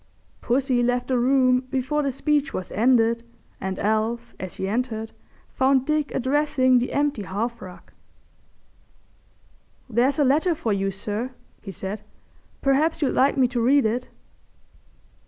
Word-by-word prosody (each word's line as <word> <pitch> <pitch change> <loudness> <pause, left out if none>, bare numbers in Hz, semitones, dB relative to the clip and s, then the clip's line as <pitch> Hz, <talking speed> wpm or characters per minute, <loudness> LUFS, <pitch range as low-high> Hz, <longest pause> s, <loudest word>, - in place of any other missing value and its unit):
Pussy 255 0 +1
left 245 +1 0
the 255 -2 +2
room 255 0 +3
before 265 +3 -1
the 280 - 0
speech 295 +2 0
was 185 - -5
ended, 230 0 +3 0.4
and 190 0 -4
Alf, 225 +3 -1
as 185 -1 -6
he 190 - -3
entered, 225 0 -2 0.4
found 265 0 +2
Dick 305 -1 0
addressing 260 -1 +2
the 245 - -2
empty 285 -5 0
hearth 220 +5 -4
rug. 185 -1 -12 2.0
"There's 250 +4 +1
a 295 - +3
letter 310 +6 +2
for 230 -9 -1
you, 195 0 0
sir," 210 +6 -4 0.3
he 195 - -9
said. 195 +2 -5 0.6
"Perhaps 295 +4 +2
you'd 275 - +1
like 275 +2 +3
me 260 -2 +4
to 245 -1 -1
read 270 +2 +4
it." 240 +3 -1
250 Hz, 140 wpm, -24 LUFS, 225-275 Hz, 2.0 s, me